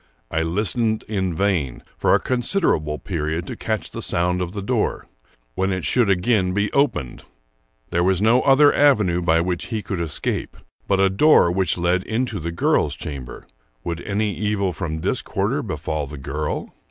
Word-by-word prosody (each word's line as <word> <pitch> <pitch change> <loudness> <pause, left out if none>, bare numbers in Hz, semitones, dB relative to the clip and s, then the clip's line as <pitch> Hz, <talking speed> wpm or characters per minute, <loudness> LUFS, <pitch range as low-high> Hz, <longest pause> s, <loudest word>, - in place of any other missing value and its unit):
I 80 - 0
listened 110 +6 0
in 95 -5 -1
vain 85 -9 -1
for - - +3
a - - +3
considerable 120 - 0
period 80 -1 -3
to - - -6
catch 110 -3 -3
the - - -6
sound 90 +1 +1
of 90 0 -3
the 100 - -4
door 120 0 -1 0.5
when 95 +1 0
it 95 -2 -2
should 120 -5 +2
again 95 -1 +2
be 105 0 0
opened. 140 - 0 0.7
There 85 - +1
was 95 -1 +2
no 115 +5 +4
other 145 +1 +5
avenue 105 -12 +3
by 80 -1 +3
which 90 0 -2
he 110 -3 -4
could 95 -4 -3
escape, 80 -3 -3 0.3
but 100 -1 +2
a 95 - +5
door 100 - +5
which 90 -2 0
led 90 +1 +1
into 115 -1 -2
the 85 +1 -4
girl's 85 - +1
chamber. 65 -5 -7 0.4
Would 85 0 -4
any 105 +1 -1
evil 105 -3 -1
from 80 -4 -4
this - - 0
quarter - - -1
befall 75 -1 -3
the 75 +1 -8
girl? 75 +3 -4
95 Hz, 175 wpm, -22 LUFS, 85-105 Hz, 0.7 s, other